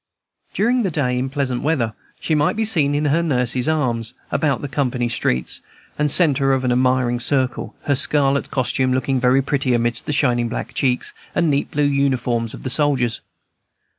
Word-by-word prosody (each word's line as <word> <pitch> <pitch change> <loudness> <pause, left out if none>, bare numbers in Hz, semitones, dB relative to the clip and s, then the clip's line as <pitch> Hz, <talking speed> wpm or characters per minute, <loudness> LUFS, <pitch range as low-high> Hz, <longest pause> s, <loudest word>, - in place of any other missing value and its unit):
During 240 +4 +2
the 200 - 0
day, 140 -6 -1
in 130 +1 -2
pleasant 135 -3 -2
weather, 135 -8 0 0.3
she 160 - -2
might 150 -1 +2
be 220 +1 0
seen 150 -9 +2
in 150 +1 0
her 150 +4 +2
nurse's 125 -3 +1
arms, 125 -6 -1 0.2
about 145 -3 0
the - - -2
company 125 -3 -1
streets, 65 - -1 0.3
the 150 0 0
centre 140 -4 +3
of 130 -1 0
an 125 - +1
admiring 125 -1 +1
circle, 130 0 -1
her 145 - +1
scarlet 140 +1 +2
costume 130 0 0
looking 130 +1 0
very 125 +2 +3
pretty 135 -2 0
amidst 120 0 0
the - - -1
shining 120 -5 +1
black - - -5
cheeks 125 -2 -1 0.2
and 170 -3 +2
neat 140 0 0
blue 150 - -1
uniforms 130 -5 0
of - - -12
the 130 - -1
soldiers. 135 -5 +1
135 Hz, 180 wpm, -20 LUFS, 125-145 Hz, 0.3 s, centre